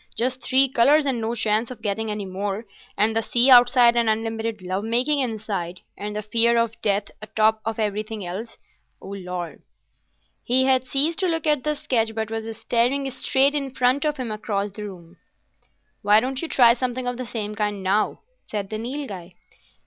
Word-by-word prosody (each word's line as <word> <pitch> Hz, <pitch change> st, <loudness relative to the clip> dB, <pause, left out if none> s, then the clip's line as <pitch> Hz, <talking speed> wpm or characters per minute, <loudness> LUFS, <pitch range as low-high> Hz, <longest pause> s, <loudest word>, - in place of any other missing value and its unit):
Just 255 Hz, +2 st, -1 dB
three 265 Hz, +1 st, +3 dB
colours 275 Hz, +4 st, +4 dB
and 255 Hz, -4 st, -1 dB
no 225 Hz, +2 st, -2 dB
chance 220 Hz, 0 st, +1 dB
of 255 Hz, -, -10 dB
getting 220 Hz, +1 st, -2 dB
any 210 Hz, -1 st, -3 dB
more, 195 Hz, +3 st, -4 dB, 0.3 s
and 220 Hz, +2 st, +2 dB
the 225 Hz, -, +2 dB
sea 245 Hz, +4 st, +3 dB
outside 245 Hz, -1 st, +7 dB
and 235 Hz, -1 st, +2 dB
unlimited 225 Hz, 0 st, -2 dB
love 185 Hz, +2 st, -3 dB
making 250 Hz, +6 st, +1 dB
inside, 210 Hz, -8 st, -3 dB
and 210 Hz, +1 st, -6 dB
the 210 Hz, -, -3 dB
fear 235 Hz, +2 st, +4 dB
of 230 Hz, -1 st, -1 dB
death 205 Hz, -1 st, 0 dB
atop 215 Hz, +1 st, +1 dB
of 225 Hz, -1 st, -2 dB
everything 215 Hz, -1 st, -3 dB
else, 195 Hz, +7 st, -6 dB, 0.4 s
O -, -, -11 dB
Lord!" 180 Hz, -3 st, -6 dB, 0.8 s
He 255 Hz, +2 st, +3 dB
had 260 Hz, -1 st, +2 dB
ceased 290 Hz, +6 st, 0 dB
to 375 Hz, -, +1 dB
look 325 Hz, -2 st, -1 dB
at 300 Hz, -3 st, +1 dB
the 300 Hz, 0 st, 0 dB
sketch, 225 Hz, -5 st, -1 dB
but 220 Hz, -1 st, -3 dB
was 225 Hz, 0 st, -5 dB
staring 265 Hz, +4 st, 0 dB
straight 265 Hz, +2 st, +2 dB
in 280 Hz, -2 st, -2 dB
front 255 Hz, +4 st, +2 dB
of 300 Hz, -1 st, -1 dB
him 250 Hz, -4 st, -4 dB
across 210 Hz, -1 st, -3 dB
the 210 Hz, +2 st, -7 dB
room. 175 Hz, -3 st, -11 dB, 0.8 s
"Why 205 Hz, +1 st, +5 dB
don't 260 Hz, +3 st, -3 dB
you 330 Hz, -, -3 dB
try 240 Hz, -6 st, +5 dB
something 250 Hz, +1 st, -3 dB
of 245 Hz, -1 st, -2 dB
the 255 Hz, -, -5 dB
same 215 Hz, -3 st, -4 dB
kind 205 Hz, -2 st, -2 dB
now?" 200 Hz, +3 st, 0 dB, 0.3 s
said 205 Hz, -2 st, -4 dB
the 215 Hz, -, -3 dB
Nilghai. 225 Hz, -8 st, -6 dB
225 Hz, 185 wpm, -23 LUFS, 210-255 Hz, 0.8 s, outside